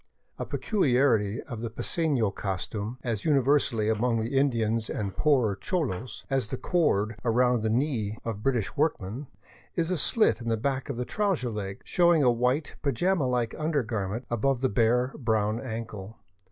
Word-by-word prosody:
A - - -2
peculiarity 125 - +1
of 115 -2 -7
the 115 - -3
pacefio 125 - 0
costume, 100 +4 -4
as 115 -4 -2
universal 140 -5 +2
among 110 +2 +1
the 115 +5 -2
Indians 115 -5 +1
and 100 -3 -3
poorer 130 -9 +3
cholos 130 - -3
as 135 -5 0
the 130 - -4
cord 110 - +1
around 125 0 +3
the 110 - 0
knee 115 -4 0
of 110 -3 -4
British 120 -5 0
workmen, 140 -4 -1 0.5
is 170 +1 0
a 180 - +1
slit 215 - +2
in 115 - -3
the 115 - +1
back 135 +4 -2
of 135 - -3
the 125 - -2
trouser 190 - 0
leg, 100 -2 -5
showing 170 -3 +3
a 125 - +5
white, 125 +5 0
pajama 150 +2 +1
like 125 -2 0
undergarment 120 - -1
above 125 +2 +1
the 130 - +2
bare 120 +4 +2
brown 110 -3 +1
ankle. 110 -3 -6
120 Hz, 160 wpm, -27 LUFS, 110-140 Hz, 0.5 s, a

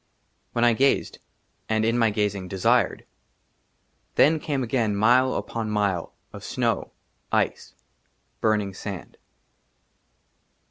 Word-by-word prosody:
WHEN 120 - +1
I 120 -1 +5
GAZED, 135 +4 +1 0.5
AND 110 0 +1
IN 115 +1 +2
MY 115 -2 +3
GAZING, 105 -3 -1
DESIRED, 95 0 +1 1.1
THEN 155 +2 +5
CAME 140 -3 -2
AGAIN 115 -3 0
y^t - - -2
MILE 125 +5 +4
UPON 115 -2 -3
MILE, 100 -5 0 0.2
OF - - -9
SNOW, - - -1 0.4
ICE, - - -1 0.7
BURNING 105 -3 +1
SAND. 95 -1 -7
110 Hz, 110 wpm, -25 LUFS, 100-120 Hz, 1.1 s, I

